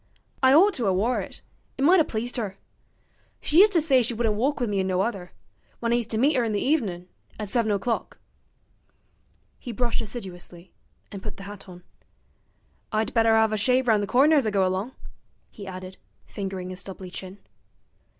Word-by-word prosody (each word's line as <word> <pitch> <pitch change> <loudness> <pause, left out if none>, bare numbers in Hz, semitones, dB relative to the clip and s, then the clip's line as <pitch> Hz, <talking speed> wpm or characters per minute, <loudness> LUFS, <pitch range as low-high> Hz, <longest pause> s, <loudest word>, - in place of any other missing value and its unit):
'I 260 0 +6
ought 390 +6 +6
to 235 -9 -2
'a' 190 - +3
wore 230 +7 +1
it - - -10 0.3
it 270 - -1
might 355 +5 +6
'a' - - +5
pleased 240 0 -3
'er. 200 -4 -4 0.8
She 310 - +2
used 415 +1 +7
to 335 - +4
say 270 -5 +5
she 235 0 -2
wouldn't 225 -1 +1
walk 270 +8 0
with 245 - 0
me 205 -2 -1
in 190 - 0
no 185 0 +1
other 195 -5 -3 0.5
when 235 0 0
I - - +4
used 230 -2 -3
to 220 - -1
meet 280 +6 +3
'er 250 - +2
in 225 -2 -1
the 205 - 0
evenin', 205 - -1 0.3
at 210 -2 -4
seven 225 -1 +1
o'clock.' 205 +4 -2 1.4
He 245 - -7
brushed 235 +1 -1
assiduously, 185 -5 -8 0.4
and 200 -2 -7
put - - -7
the 195 - -9
hat 200 -1 -10
on. 180 -1 -12 1.1
'I'd 220 +3 -1
better 225 -1 +4
'ave 220 -1 +3
a - - 0
shave 250 +4 +2
round 215 -3 +4
the 205 - -2
corner 285 +8 +4
as 265 -6 +2
I - - +3
go 195 -2 +2
along,' 190 +7 -2 0.6
he 200 -2 -10
added, 185 0 -8 0.3
fingering 190 -2 -5
his 185 - -7
stubbly 185 -1 -8
chin. 190 +1 -7
220 Hz, 200 wpm, -25 LUFS, 195-250 Hz, 1.4 s, used